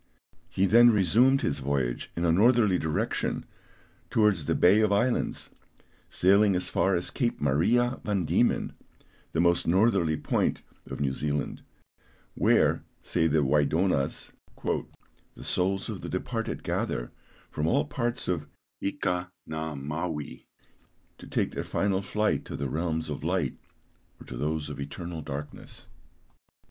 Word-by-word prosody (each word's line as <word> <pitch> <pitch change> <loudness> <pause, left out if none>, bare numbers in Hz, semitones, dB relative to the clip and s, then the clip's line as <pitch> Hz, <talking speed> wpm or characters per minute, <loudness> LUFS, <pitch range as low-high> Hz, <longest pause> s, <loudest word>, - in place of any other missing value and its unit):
He 95 - +1
then 120 +4 +7
resumed 115 +6 +4
his 70 - 0
voyage 65 -3 -2
in 85 - -1
a 85 - +4
northerly 105 0 +4
direction 80 -1 -1 0.6
towards 105 -9 +2
the - - +1
Bay 100 +5 +5
of 105 -1 +2
Islands, 120 +5 0 0.6
sailing 100 +2 +4
as 90 - -1
far 95 0 +2
as 85 - -1
Cape 120 -4 -1
Maria 115 - +2
Van 100 -4 0
Diemen, - - +1 0.6
the 80 - -1
most 85 0 +3
northerly 90 -4 +3
point - - 0 0.2
of - - -6
New 70 -2 0
Zealand, 75 +1 -2 0.7
where, - - +3 0.2
say 80 - +1
the 75 -1 +2
Waïdonas, 75 +2 +1 0.3
"the - - -6
souls 95 +1 0
of 105 -5 -5
the - - -6
departed 115 +5 -3
gather - - -2 0.4
from 75 +1 -1
all 75 -2 +2
parts 120 - -3
of 85 -5 -1 0.3
Ika 90 -2 -2
Na 80 -1 -4
Mawi, 75 +2 -5 0.7
to - - -11
take - - -1
their - - -4
final 100 -1 0
flight 105 +2 0
to - - -6
the 70 - -2
realms 80 +2 -2
of 75 -2 -5
light 85 -5 0 0.6
or - - -12
to 65 - -8
those 75 +3 -2
of 75 -1 -7
eternal 80 +4 -6
darkness." 75 0 -8
85 Hz, 140 wpm, -28 LUFS, 75-100 Hz, 0.7 s, then